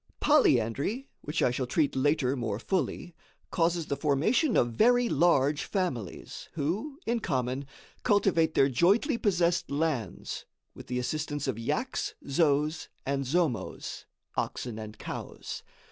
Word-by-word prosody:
Polyandry 200 - +3
(which 150 +2 -1
I 125 - +4
shall 125 0 -2
treat 150 +3 +1
later 135 -1 +2
more 115 -5 -2
fully) 175 - -2 0.4
causes 170 -1 +1
the 140 - -1
formation 165 - +2
of 120 - +3
very 245 - +4
large 145 - +3
families, 155 - -3
who, 185 - -2
in 235 +1 +1
common, 130 - -2 0.3
cultivate 175 -6 +3
their 135 - +5
jointly 200 - +3
possessed 175 -4 +1
lands, 140 - -2 0.3
with - - -11
the 125 - -2
assistance 145 +2 -2
of 120 -4 -2
yaks, 240 - -2
zos 150 +1 +1 0.2
and 140 0 -1
zomos 130 - -1 0.3
(oxen 115 -3 -3
and 110 0 -8
cows). - - -6
150 Hz, 130 wpm, -29 LUFS, 130-180 Hz, 0.4 s, their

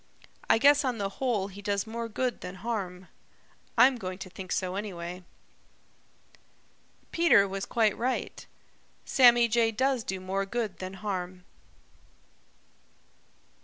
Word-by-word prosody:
I - - +6
guess 285 +4 +5
on 255 -3 -1
the 200 -2 -2
whole 230 -7 0
he 200 +1 -11
does 200 0 -1
more 230 +1 -5
good 245 +2 -2
than 180 - -7
harm. 185 -3 -4 0.7
I'm 250 +2 +6
going 185 -3 -5
to 185 - -14
think 185 0 -9
so 185 -1 -1
anyway." 180 -3 -6 1.9
Peter 330 -12 +5
was 195 0 -5
quite 220 -3 +2
right. 255 +2 -3 0.6
Sammy 240 -2 +6
Jay 230 0 +2
does 255 +2 0
do 190 -2 -4
more 195 +1 -2
good 220 -3 -3
than 185 +1 -6
harm. 185 -2 -4
205 Hz, 130 wpm, -28 LUFS, 185-235 Hz, 1.9 s, I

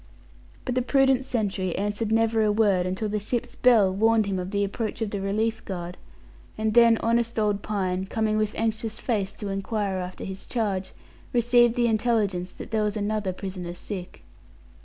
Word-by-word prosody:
But 250 - -1
the 255 - +1
prudent 265 0 +3
sentry 195 -8 -1
answered 205 +2 -2
never 225 0 +3
a 210 - +3
word, 200 -4 +2
until 190 +4 -2
the 210 0 -1
ship's 230 +3 -3
bell 220 -7 +4
warned 220 +2 +3
him 195 -2 -2
of 180 0 -4
the 200 0 0
approach 210 +2 -3
of 220 -3 -2
the 200 - -3
relief 220 +3 -1
guard; 180 -2 -5 0.6
and 220 0 0
then 235 -1 +6
honest 230 0 +1
old 210 -2 +1
Pine, 190 -2 -2
coming 215 +1 0
with 215 -1 0
anxious 220 0 -2
face 205 -5 -1
to 205 - -5
inquire 195 0 -2
after 180 0 -5
his 190 0 -7
charge, 195 -5 -2 0.4
received 240 0 +4
the 240 -1 +2
intelligence 215 -5 +1
that - - -10
there 220 -1 +1
was 210 0 -1
another 210 -1 -1
prisoner 185 -2 -6
sick. 180 -1 -7
210 Hz, 180 wpm, -26 LUFS, 195-225 Hz, 0.6 s, then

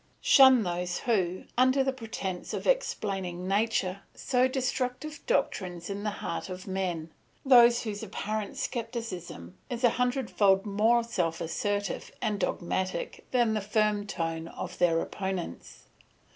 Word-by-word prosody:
"Shun 265 -4 +7
those 175 0 -2
who, 185 -6 0 0.2
under 260 +2 +4
the 265 0 0
pretence 220 -7 -5
of - - -5
explaining 195 - -1
nature, 195 -2 0
sow 255 -1 +2
destructive 260 +3 -2
doctrines 180 - -1
in 200 +1 -4
the 210 - -1 0.2
heart 170 - -3
of 185 0 -7
men, 180 -4 -3 0.3
those 240 -2 +7
whose 210 -3 -4
apparent 215 0 -4
scepticism 225 - -5
is 245 0 -4
a 240 - +6
hundredfold 220 -6 +2
more 220 +4 +3
self 175 -8 -1
assertive 200 +4 -2
and 210 -1 -1
dogmatic 185 - -2
than 240 -3 +2
the 215 - 0
firm 210 0 +1
tone 165 -3 -3
of 180 +1 -7
their 170 -2 +4
opponents. 190 - -5
205 Hz, 130 wpm, -29 LUFS, 180-240 Hz, 0.3 s, Shun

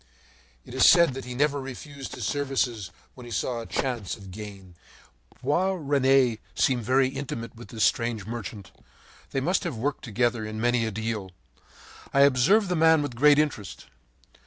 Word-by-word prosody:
It - - -11
was - - +5
said 170 -6 +6
that 135 0 -7
he 125 0 -6
never 145 +1 +1
refused 135 +1 -8
his - - -5
services 130 -8 -1 0.2
when 125 -2 -12
he - - -10
saw 120 +1 -2
a 115 - -7
chance 120 -7 -2
of 95 -3 -12
gain. 100 -2 -10 0.7
Boisrene 140 - +2 0.2
seemed 130 -2 +2
very 130 +4 +2
intimate 120 -4 -6
with 120 +1 -11
this 110 -3 -2
strange 115 -4 +1
merchant. 110 -3 -7 0.6
They 135 - -2
must 180 +9 +1
have 165 -10 -4
worked 140 +6 -2
together 120 0 0
in 110 0 -5
many 120 0 +1
a - - -3
deal. 110 -3 -4 0.8
I 140 - +3
observed 140 - +4
the 180 - +1
man 160 -1 +4
with 145 - -4
great 145 +3 +5
interest. 145 -10 -2
125 Hz, 165 wpm, -26 LUFS, 110-140 Hz, 0.8 s, said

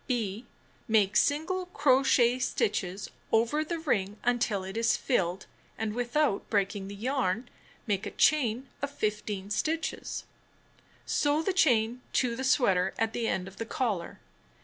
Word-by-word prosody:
(b) 230 -2 -2 0.4
Make 210 -3 +3
single 350 +6 +1
crochet 255 -6 +3
stitches 205 - -1 0.2
over 235 +7 +2
the 335 +2 -3
ring 210 - -1
until 235 -5 +1
it 190 +2 -7
is 230 0 +2
filled, 190 -7 0 0.3
and 220 -1 -2
without 245 0 0
breaking 200 -1 0
the 200 - -7
yarn, 230 -1 -1 0.4
make 200 -3 -1
a - - -2
chain 265 -4 +2
of 285 - -1
15 210 -5 -3
stitches. 320 +8 -2 0.8
Sew 295 +2 +1
the 385 - 0
chain 245 - +3
to 245 -3 +1
the 260 - -4
sweater 195 -9 +2
at 225 0 0
the 235 -1 -1
end 185 -3 -1
of 195 - -12
the 230 - -4
collar. 210 -11 -2
230 Hz, 145 wpm, -29 LUFS, 200-275 Hz, 0.8 s, Make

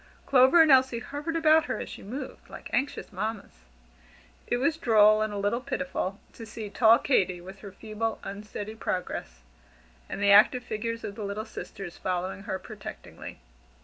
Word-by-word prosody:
Clover 265 +5 +6
and 310 - +4
Elsie 260 -2 +5
hovered 290 +7 -5
about 320 -1 +4
her - - -3
as - - -5
she - - -9
moved, 260 +6 -8
like - - -10
anxious 280 -6 -2
mammas. 195 - -5 0.8
It 240 - +1
was 285 +6 +1
droll, 215 -7 +5
and 215 0 -1
a 205 - -4
little 205 +5 0
pitiful, 260 -7 -3
to 230 - -10
see 215 -2 -7
tall 225 +1 +6
Katy 190 -10 +1
with 190 +2 -11
her 200 - -10
feeble, 220 +2 -4
unsteady 205 +1 -7
progress, 180 - -4 0.7
and - - -5
the 200 0 +4
active 220 +5 +6
figures 230 +1 -4
of 200 - -5
the 215 0 -7
little 205 +2 -4
sisters 195 -5 -8
following 185 +1 -3
her 190 - -1
protectingly. 210 +1 -10
215 Hz, 170 wpm, -27 LUFS, 200-255 Hz, 0.8 s, Clover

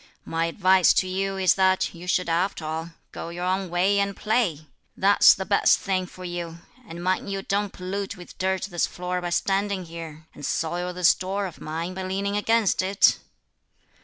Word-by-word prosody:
My 165 0 -1
advice 185 +1 +4
to 185 - +2
you 195 +1 -2
is 190 -1 +4
that 190 -1 +2
you 175 +1 -10
should 180 0 +1
after 170 0 -1
all 160 +2 -4 0.2
go - - -7
your 175 +1 -5
own 185 0 -1
way 185 +4 +2
and 200 0 -1
play; 210 -9 0 0.3
that's 200 +1 +6
the 190 - -5
best 200 - +4
thing 185 -2 -2
for 185 +1 -11
you; 175 -2 -5 0.3
and 170 -2 -8
mind 185 +2 -1
you 195 0 -3
don't 200 0 -1
pollute 195 +2 -5
with 180 - -13
dirt 190 0 0
this 175 -3 -1
floor 180 0 -4
by 175 - -3
standing 195 +1 0
here, 165 -2 -9
and 145 - -12
soil 175 +4 -2
this 180 -1 +4
door 195 +2 -3
of 180 - -9
mine 165 +3 -4
by 190 - -5
leaning 195 +2 -2
against 220 -1 +2
it!" 195 +2 +3
185 Hz, 190 wpm, -25 LUFS, 175-195 Hz, 0.3 s, that's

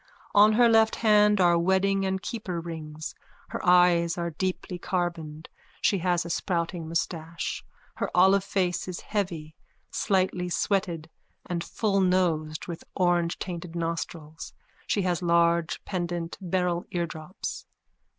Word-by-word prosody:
_On 210 +1 +6
her 240 +1 +6
left 225 -1 +4
hand 210 -2 +4
are 175 -2 +5
wedding 190 +2 +2
and 190 0 -2
keeper 195 -7 -4
rings. 160 -2 -6 0.4
Her - - -5
eyes 175 -2 +4
are 170 0 -2
deeply 180 +1 -3
carboned. 165 -4 -3 0.3
She 200 - +2
has 175 -1 +1
a - - -5
sprouting 170 -2 -2
moustache. 165 0 -3 0.3
Her - - -1
olive 190 +2 +5
face 185 -3 -1
is 180 -2 -5
heavy, 170 -7 -3 0.4
slightly 185 -2 0
sweated 175 -4 -1 0.4
and 170 -1 -3
fullnosed 180 -7 0
with 170 -2 -6 0.2
orangetainted 175 -1 0
nostrils. 165 -2 -4 0.3
She 200 - +1
has 180 -1 0
large 170 -1 +2
pendant 175 -2 -3
beryl 180 -1 0
eardrops.) 170 +1 -5
175 Hz, 120 wpm, -27 LUFS, 170-190 Hz, 0.4 s, On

